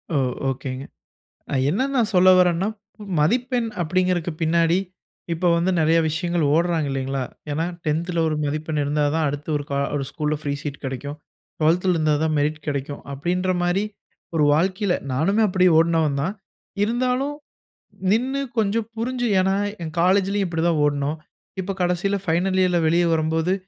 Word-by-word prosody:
ஓ! - - +3 0.3
ஒகேங்க. 130 0 -4 0.7
ஐ - - +2
என்ன 195 +10 0
நான் 230 -4 +2
சொல்ல 185 +1 +6
வர்றேன்னா 180 +1 +3 0.5
மதிப்பெண் 240 - +1
அப்டிங்கறக்கு 180 0 0
பின்னாடி 165 +2 +3 0.5
இப்ப 170 +1 +1
வந்து 170 +2 +1
நிறைய 160 +1 +4
விஷயங்கள் 170 +1 0
ஓடராங்க 165 -2 +1
இல்லைங்களா, 135 0 -2 0.3
ஏன்னா 155 +3 0 0.2
10த்ல 165 +3 -1
ஒரு 155 - -1
மதிப்பெண் 155 +1 -2
இருந்தா 145 +1 0
தான் 160 -2 +1
அடுத்து 145 +2 -5
ஒரு 145 - -3
க - - -3 0.2
ஒரு 140 - -1
ஸ்கூல்ல 150 -1 -1
ஃப்ரீ 145 -2 -2
சீட் 145 -1 -5
கிடைக்கும். 135 +2 -5 0.4
12த்ல 180 +4 +3
இருந்தா 155 -2 +2
தான் 160 -1 +1
மெரிட் 150 +2 0
கிடைக்கும். 140 0 -3
அப்டின்ற 180 +6 -1
மாரி 175 +4 +1 0.5
ஒரு 150 - +4
வாழ்க்கையில 185 +4 +1 0.2
நானுமே 195 +12 +2
அப்டி 185 -1 +3
ஓடுனவன் 160 -3 +2
தான். 190 +6 -2 0.5
இருந்தாலும், 250 +5 0 0.8
நின்னு 260 +5 0 0.2
கொஞ்சம் 220 +1 +1
புரிஞ்சு 245 +1 -1
ஏன்னா 190 +1 +2 0.3
என் 160 -1 -6
காலேஜ்லயும் 195 +2 +2
இப்படி 165 -1 -1
தான் 165 -3 +1
ஓடுனோம். 145 +1 -1 0.4
இப்ப 195 +2 -4
கடைசீல 180 +3 0
ஃபைனல் 180 +3 +1
இயர்ல 180 -2 +2
வெளியே 170 +2 +3
வரும்போது 160 +3 +1
170 Hz, 150 wpm, -23 LUFS, 150-190 Hz, 0.8 s, சொல்ல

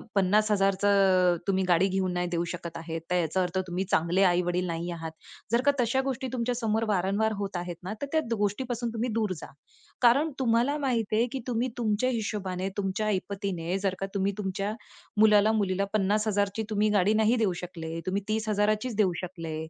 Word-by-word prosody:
50,000चं 195 -2 +3
तुम्ही 190 -1 +2
गाडी 180 +1 +4
घेऊन 190 -1 0
नाही 180 0 -1
देऊ 170 -1 0
शकत 170 -1 -6
आहेत; 165 0 -5
तर - - +3
याचा 170 +2 0
अर्थ 180 +1 -3
तुम्ही 180 +2 -2
चांगले 170 +4 +2
आई-वडील 180 0 +2
नाही 170 +1 -3
आहात. 165 -1 -5 0.4
जर 235 +1 +3
का 285 - +6
तशा 245 +2 +2
गोष्टी 265 0 -3
तुमच्या 245 0 -1
समोर 225 -1 0
वारंवार 200 +2 +1
होत 200 -1 -4
आहेत 175 0 -4
ना, 190 +3 -4
तर - - -1
त्या 320 - +3 0.2
गोष्टीपासून 235 +4 -1
तुम्ही 235 +2 -1
दूर 215 -3 0
जा. - - -8 0.5
कारण 265 +6 +5
तुम्हाला 245 +3 +2
माहीत 245 -7 -1
आहे 225 +2 +3
की 270 - -3
तुम्ही 245 +1 0
तुमच्या 225 +1 +1
हिशोबाने, 200 -5 -2
तुमच्या 195 +2 -1
ऐपतीने, 195 -3 -2
जर 195 -1 -1
का 195 - -1
तुम्ही 200 0 +1
तुमच्या 195 +1 -2 0.5
मुलाला-मुलीला 210 -2 +4
50,000ची 205 0 +1
तुम्ही 215 0 +2
गाडी 205 0 +3
नाही 220 +2 +3
देऊ 215 -5 +1
शकले, 165 -2 -6
तुम्ही 195 +2 -1
30,000चीच 215 +1 0
देऊ 200 -4 +2
शकले, 165 -3 -6
200 Hz, 175 wpm, -28 LUFS, 185-220 Hz, 0.5 s, का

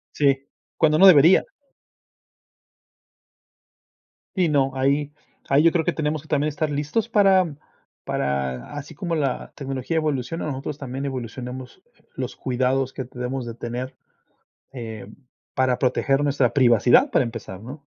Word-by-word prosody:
Sí, 140 -1 +2 0.3
cuando 155 -1 +3
no 195 - +8
debería. 165 0 +7 2.9
Sí, 185 -3 +2
no, 140 -3 +2
ahí 140 +2 +1 0.4
ahí 140 +2 +4
yo 165 - +6
creo 165 -1 +1
que - - +1
tenemos 155 -1 -2
que 155 - -19
también 150 -1 +1
estar 155 +1 -2
listos 150 +11 -1
para 190 -7 +4 0.5
para 65 -2 -2
así 145 +2 -7
como 170 +2 -2
la 140 -5 -2
tecnología 135 +3 -3
evoluciona, 155 0 -2
nosotros 140 0 -4
también 135 -1 -5
evolucionemos 125 +2 -6 0.3
los 130 -1 -4
cuidados 130 +1 0
que 130 - -4
debemos 125 +1 -5
de 115 - -6
tener, 120 +2 -5 0.8
em, 110 -4 -8 0.4
para 130 -1 +1
proteger 135 +2 +1
nuestra 140 -4 +2
privacidad 120 -3 +5
para - - +3
empezar, 100 -5 -7
¿no? 135 +6 -10
135 Hz, 135 wpm, -23 LUFS, 125-150 Hz, 2.9 s, no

